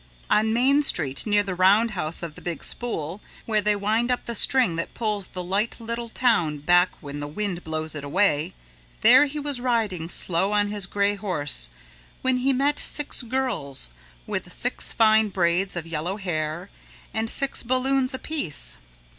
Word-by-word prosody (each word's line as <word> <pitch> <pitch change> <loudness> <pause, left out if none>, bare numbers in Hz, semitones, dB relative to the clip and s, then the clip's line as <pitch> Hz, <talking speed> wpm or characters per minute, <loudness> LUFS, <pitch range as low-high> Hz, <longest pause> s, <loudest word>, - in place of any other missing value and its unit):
On 220 +1 +3
Main 265 +5 +3
Street 150 - +2
near 205 -1 +3
the 195 -2 -4
Roundhouse 185 -3 +2
of 165 -3 -5
the - - -14
Big 170 -4 -5
Spool, 195 -6 -3 0.2
where 215 -2 +1
they 210 +1 +1
wind 215 +4 0
up 250 - -1
the 235 - -4
string 240 -5 +3
that 165 - -5
pulls 210 -4 -2
the 180 - -7
light 200 +5 -1
little 235 +1 -5
town 200 -12 +1
back 175 +5 +3
when 145 -2 -7
the 145 - -4
wind 180 +2 -4
blows 155 0 -3
it 150 -2 -6
away, 165 +1 +1 0.5
there 255 +6 +7
he 295 +2 -5
was 285 -4 -1
riding 215 -9 -1
slow 185 +3 +2
on 205 0 +2
his 205 -2 0
gray 200 0 +1
horse 150 - -1 0.5
when 260 -1 +2
he 260 +2 +1
met 275 +3 +1
six 295 -2 +2
girls 225 - -2 0.3
with - - -5
six - - -1
fine 220 -1 +4
braids 180 0 0
of 170 -2 -4
yellow 165 +4 -3
hair 170 -1 -4 0.4
and 220 0 -1
six 275 +3 +3
balloons 255 +2 +1
apiece. 175 - -2
205 Hz, 170 wpm, -24 LUFS, 170-235 Hz, 0.5 s, there